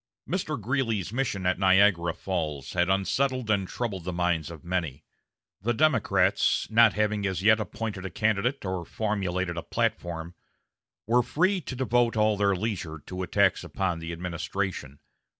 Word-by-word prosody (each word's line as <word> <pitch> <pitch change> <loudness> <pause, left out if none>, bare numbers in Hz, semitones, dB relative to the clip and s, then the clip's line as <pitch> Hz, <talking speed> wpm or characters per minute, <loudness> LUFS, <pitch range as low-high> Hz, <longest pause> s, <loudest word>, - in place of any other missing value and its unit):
Mr. 160 -6 -2
Greeley's 115 -4 -1
mission 115 -7 -1
at 90 +1 +1
Niagara 95 -3 +4
Falls 75 -7 -3
had 90 0 +1
unsettled 125 +5 +1
and 100 -3 +1
troubled 100 -6 -4
the 90 - -3
minds 85 -3 0
of 85 -1 -11
many. 85 -6 -2 0.6
The 120 +4 0
Democrats, 150 -4 +2
not 115 -1 +6
having 105 -1 0
as 95 -1 -3
yet 110 +1 +5
appointed 105 -1 -4
a - - -7
candidate 110 +5 0
or 95 -2 -2
formulated 95 -3 -2
a - - -1
platform, 85 +2 -2 0.7
were 120 +3 +4
free 185 +10 +1
to 130 - -6
devote 120 -2 +1
all 110 0 +3
their 100 -1 +2
leisure 90 -6 -3
to 95 0 -5
attacks 90 - +2
upon 90 -3 -2
the 85 0 -6
administration. 85 -3 -4
100 Hz, 150 wpm, -27 LUFS, 90-115 Hz, 0.7 s, not